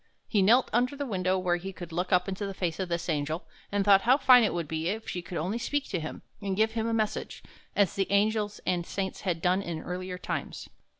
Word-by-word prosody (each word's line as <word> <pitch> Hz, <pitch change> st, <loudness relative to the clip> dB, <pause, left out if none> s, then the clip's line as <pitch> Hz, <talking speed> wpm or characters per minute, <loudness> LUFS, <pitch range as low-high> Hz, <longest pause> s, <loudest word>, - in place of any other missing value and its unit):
He 210 Hz, -, +2 dB
knelt 235 Hz, +7 st, +5 dB
under 250 Hz, +4 st, +2 dB
the 285 Hz, 0 st, -3 dB
window, 185 Hz, -5 st, 0 dB
where 180 Hz, -1 st, +1 dB
he 190 Hz, +2 st, -6 dB
could 175 Hz, -2 st, -9 dB
look 175 Hz, +2 st, -2 dB
up 180 Hz, 0 st, +3 dB
into 195 Hz, +1 st, -3 dB
the 195 Hz, -, -6 dB
face 170 Hz, -2 st, -2 dB
of 185 Hz, -2 st, -2 dB
this 170 Hz, 0 st, -2 dB
Angel, 155 Hz, +1 st, -1 dB, 0.3 s
and 200 Hz, -1 st, +1 dB
thought 200 Hz, -1 st, +7 dB
how 250 Hz, +5 st, +5 dB
fine 255 Hz, -4 st, +7 dB
it 215 Hz, -, +2 dB
would 170 Hz, -3 st, -3 dB
be 160 Hz, +2 st, -2 dB
if 220 Hz, +3 st, -4 dB
she 180 Hz, -, -3 dB
could 175 Hz, 0 st, -6 dB
only 190 Hz, +9 st, -1 dB
speak 290 Hz, +3 st, -1 dB
to 180 Hz, -, -1 dB
him, 155 Hz, 0 st, -6 dB, 0.2 s
and 195 Hz, -2 st, -2 dB
give 220 Hz, +1 st, +3 dB
him 225 Hz, 0 st, -1 dB
a -, -, 0 dB
message, 215 Hz, -2 st, -2 dB, 0.3 s
as 200 Hz, -4 st, +3 dB
the 195 Hz, 0 st, -1 dB
angels 210 Hz, +1 st, +1 dB
and 180 Hz, -2 st, +1 dB
saints 190 Hz, +2 st, -4 dB
had 175 Hz, -4 st, -2 dB
done 185 Hz, +2 st, +3 dB
in 170 Hz, -4 st, -4 dB
earlier 180 Hz, 0 st, -5 dB
times. -, -, -5 dB
190 Hz, 245 wpm, -28 LUFS, 175-215 Hz, 0.3 s, thought